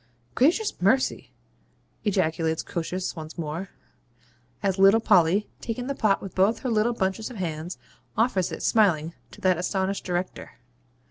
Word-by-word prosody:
'Gracious 345 - +2
mercy!' 225 +8 +1 0.7
ejaculates 160 -5 0
Croesus 180 +2 -3
once 160 0 -8
more, 165 +4 -4 0.9
as 195 -1 0
little 195 +3 +7
Polly, 195 -1 +3
taking 245 +1 -4
the 275 - -2
pot 215 -7 +1
with 195 - -7
both 200 +4 +2
her 255 - -2
little 225 +2 +2
bunches 205 +1 -2
of 250 - -9
hands, 170 -1 -4 0.4
offers 215 -6 +1
it, - - -6
smiling, 170 -7 +3 0.2
to - - -14
that 185 -2 +3
astonished 190 +1 -1
Director. 180 0 -4
190 Hz, 140 wpm, -26 LUFS, 175-220 Hz, 0.9 s, little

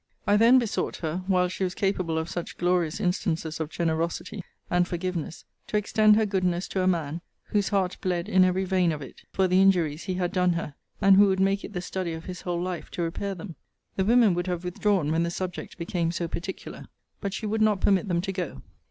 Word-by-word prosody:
I 205 - +4
then 230 +4 +6
besought 230 -4 -1
her, 165 +2 -3
while 180 -2 +3
she 185 +2 -4
was 180 -1 -2
capable 190 -6 0
of 160 0 -1
such 175 0 -5
glorious 175 -2 +1
instances 165 -3 -1
of 160 -2 -3
generosity, 170 +4 -2 0.2
and 175 0 +2
forgiveness, 175 -2 -4 0.2
to 210 - 0
extend 210 +1 +4
her 220 0 +3
goodness 185 -3 0
to 190 - -1
a 185 - +1
man, 165 -3 0 0.3
whose 205 -2 +1
heart 195 -3 0
bled 175 -2 -1
in 190 0 +5
every 185 +1 +2
vein 185 -2 +2
of 150 -2 -4
it 130 - -12
for 190 -1 +2
the 185 +1 +4
injuries 170 -5 +2
he 185 -2 -2
had 180 -1 -1
done 180 -1 +3
her; 165 -3 -4 0.3
and 195 -1 +6
who 205 0 +7
would 190 -1 +1
make 195 +1 +2
it 210 - -8
the 180 - -3
study 180 -2 -3
of 160 0 -7
his 180 -1 -7
whole 175 -1 -2
life 180 0 -4
to 175 - -2
repair 195 +4 -3
them. 175 0 -8 0.4
The 190 - +1
women 225 -1 +5
would 175 +1 -2
have 180 -1 -2
withdrawn 180 -3 0
when 165 +1 +2
the 170 - 0
subject 180 +1 -5
became 170 -1 -1
so 170 0 -2
particular. 175 +3 -6 0.3
But 200 0 -3
she 220 - -4
would 220 +1 -1
not 215 -2 +3
permit 195 0 +2
them 170 -2 +1
to 195 +1 -3
go. 175 - -4
180 Hz, 225 wpm, -26 LUFS, 170-195 Hz, 0.4 s, who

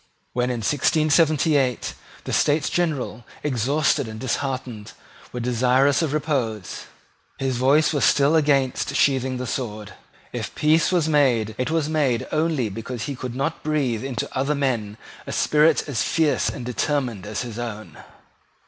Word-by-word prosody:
When 125 0 0
in 120 -2 -2
1678 150 0 +2 0.3
the - - -5
States 145 0 +2
General, 145 -9 -1 0.2
exhausted 140 +1 +1
and 110 0 -7
disheartened, 130 -3 -3 0.4
were 125 - -5
desirious 125 +4 +2
of 160 -4 0
repose, 130 - -2 0.5
his 130 -2 -1
voice 140 +6 +3
was 145 - 0
still 145 +3 +4
against 140 -3 +1
sheathing 130 -3 +2
the 125 - -4
sword. 110 -5 -5 0.4
If - - -5
peace 155 +3 +3
was 175 -4 +2
made, 125 -8 +2
it 130 - 0
was 160 -2 0
made 145 -7 +1
only 155 -6 +1
because 115 +3 -6
he 140 - -4
could 125 -1 -6
not 145 +5 -2
breathe 135 -7 -1
into 130 -4 -3
other 140 +3 0
men 115 -7 -1 0.3
a - - -4
spirit 155 +2 +3
as 135 -7 -1
fierce 160 -3 +1
and 125 -4 -6
determined 125 -4 -2
as 105 +3 -3
his 120 -2 -7
own. 110 -3 -7
135 Hz, 150 wpm, -23 LUFS, 120-150 Hz, 0.5 s, still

